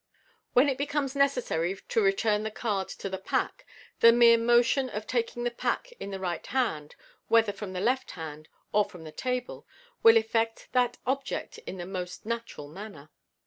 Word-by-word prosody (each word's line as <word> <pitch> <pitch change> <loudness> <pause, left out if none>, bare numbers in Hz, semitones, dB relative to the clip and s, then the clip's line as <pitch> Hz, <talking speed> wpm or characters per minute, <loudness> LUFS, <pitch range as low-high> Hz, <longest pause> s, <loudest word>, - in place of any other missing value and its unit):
When 250 +4 +6
it 270 -2 -1
becomes 285 -1 -1
necessary 250 -11 +1
to 475 -2 +2
return 235 - +2
the 220 - -2
card 210 -3 -2
to - - -6
the 190 -1 -4
pack, - - -2 0.3
the 230 - +9
mere 235 0 +7
motion 240 +3 +3
of 210 -1 -5
taking 240 0 -2
the 240 - 0
pack - - -2
in - - -5
the 195 -1 -5
right 175 -3 -3
hand, 190 - -1 0.3
whether 225 -3 +4
from 200 -3 -7
the 180 - -3
left 255 +5 +1
hand 155 -2 -8 0.2
or 210 0 +4
from 180 -4 -11
the 155 - -9
table, 250 +5 -4 0.3
will 225 0 +8
effect 225 0 0
that 250 -1 +2
object 270 - -3
in 190 - -5
the 175 - -5
most 180 0 -6
natural 230 -10 -5
manner. 155 -3 -10
225 Hz, 180 wpm, -28 LUFS, 190-250 Hz, 0.3 s, the